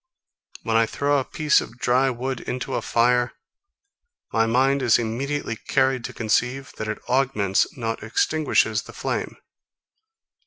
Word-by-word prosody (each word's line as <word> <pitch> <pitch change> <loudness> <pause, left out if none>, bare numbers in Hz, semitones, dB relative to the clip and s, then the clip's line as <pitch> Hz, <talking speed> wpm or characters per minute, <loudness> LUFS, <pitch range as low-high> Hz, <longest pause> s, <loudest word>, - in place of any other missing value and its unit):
When 115 -1 -1
I 115 0 +4
throw 145 +3 +1
a - - -1
piece 150 +2 +2
of 120 - -10
dry 130 0 +2
wood 130 +1 -3
into 125 0 -4
a - - 0
fire, 120 +1 +2 1.0
my 115 0 +3
mind 135 +4 +2
is 120 -4 +4
immediately 120 +3 -2
carried 130 +2 0
to - - -5
conceive, 125 +4 -1
that 110 - -4
it 110 - -3
augments, 125 -7 +2
not 115 -2 -3
extinguishes 155 +8 +1
the - - -13
flame. - - -3
125 Hz, 145 wpm, -23 LUFS, 115-135 Hz, 1.0 s, I